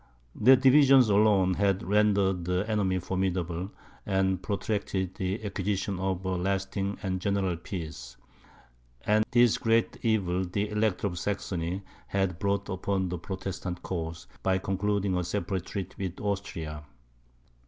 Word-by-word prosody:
Their 130 Hz, +5 st, +6 dB
divisions 135 Hz, -2 st, +6 dB
alone, 100 Hz, -3 st, +4 dB
had 100 Hz, +1 st, +1 dB
rendered 100 Hz, -3 st, +2 dB
the 90 Hz, +3 st, 0 dB
enemy 100 Hz, -4 st, +1 dB
formidable, 90 Hz, -1 st, -2 dB, 0.3 s
and 95 Hz, -2 st, +1 dB
protracted 100 Hz, -2 st, -2 dB
the 95 Hz, +4 st, -3 dB
acquisition 100 Hz, -1 st, -2 dB
of 95 Hz, 0 st, -2 dB
a 95 Hz, -1 st, 0 dB
lasting 95 Hz, +1 st, -1 dB
and 95 Hz, -2 st, -2 dB
general 100 Hz, -2 st, 0 dB
peace. 80 Hz, -8 st, -7 dB, 0.9 s
And 105 Hz, +1 st, +4 dB
this 120 Hz, -2 st, +4 dB
great 115 Hz, 0 st, +1 dB
evil 95 Hz, -5 st, +1 dB
the 100 Hz, +3 st, -2 dB
Elector 105 Hz, -2 st, 0 dB
of 90 Hz, -3 st, -2 dB
Saxony 95 Hz, -2 st, -3 dB, 0.2 s
had 95 Hz, -3 st, -1 dB
brought 100 Hz, 0 st, 0 dB
upon 95 Hz, 0 st, -1 dB
the 90 Hz, -1 st, -4 dB
Protestant 95 Hz, -1 st, -5 dB
cause 80 Hz, -2 st, -4 dB, 0.2 s
by 95 Hz, -1 st, +2 dB
concluding 95 Hz, 0 st, 0 dB
a 90 Hz, -, 0 dB
separate 95 Hz, 0 st, -3 dB
treaty 95 Hz, -2 st, -5 dB, 0.2 s
with 90 Hz, -, -14 dB
Austria. 85 Hz, -7 st, -3 dB
95 Hz, 130 wpm, -28 LUFS, 90-100 Hz, 0.9 s, Their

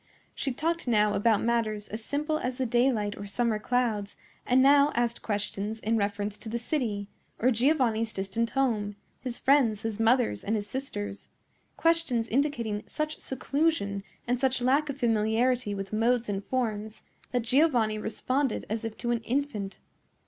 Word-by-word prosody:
She 275 Hz, -, -2 dB
talked 330 Hz, +4 st, -1 dB
now 210 Hz, -3 st, +3 dB
about 210 Hz, +1 st, +2 dB
matters 220 Hz, -3 st, 0 dB
as 215 Hz, +1 st, -6 dB
simple 300 Hz, +4 st, -1 dB
as 250 Hz, -2 st, -3 dB
the 260 Hz, -, 0 dB
daylight 235 Hz, -4 st, +2 dB
or 205 Hz, -, -7 dB
summer 225 Hz, +1 st, 0 dB
clouds, 220 Hz, -4 st, -1 dB, 0.3 s
and 250 Hz, +1 st, +4 dB
now 280 Hz, +2 st, +6 dB
asked 235 Hz, 0 st, 0 dB
questions 210 Hz, 0 st, -2 dB
in 220 Hz, +1 st, 0 dB
reference 205 Hz, 0 st, -1 dB
to 225 Hz, -, -6 dB
the 235 Hz, -, -1 dB
city, 230 Hz, -6 st, -2 dB, 0.3 s
or 255 Hz, +3 st, +3 dB
Giovanni's 235 Hz, -3 st, +2 dB
distant 195 Hz, +4 st, -2 dB
home, 220 Hz, -7 st, 0 dB, 0.2 s
his 245 Hz, -2 st, -4 dB
friends, 250 Hz, -7 st, +3 dB
his 225 Hz, -1 st, -3 dB
mother, 230 Hz, -, +3 dB
and 220 Hz, -, 0 dB
his 205 Hz, -1 st, -2 dB
sisters—questions 250 Hz, +4 st, -2 dB
indicating 235 Hz, -6 st, 0 dB
such 305 Hz, 0 st, -3 dB
seclusion, 265 Hz, -7 st, 0 dB, 0.2 s
and 245 Hz, 0 st, 0 dB
such 260 Hz, 0 st, +2 dB
lack 275 Hz, +5 st, +2 dB
of 280 Hz, -, -3 dB
familiarity 225 Hz, -1 st, +1 dB
with 195 Hz, +1 st, -6 dB
modes 235 Hz, +1 st, +2 dB
and 200 Hz, -1 st, -2 dB
forms, 220 Hz, -4 st, -2 dB, 0.3 s
that 245 Hz, -2 st, 0 dB
Giovanni 240 Hz, -4 st, +3 dB
responded 255 Hz, +4 st, -1 dB
as 220 Hz, 0 st, -2 dB
if 225 Hz, -1 st, -5 dB
to 240 Hz, -1 st, -2 dB
an 235 Hz, -, +1 dB
infant. 225 Hz, -5 st, -2 dB
230 Hz, 155 wpm, -28 LUFS, 210-260 Hz, 0.3 s, now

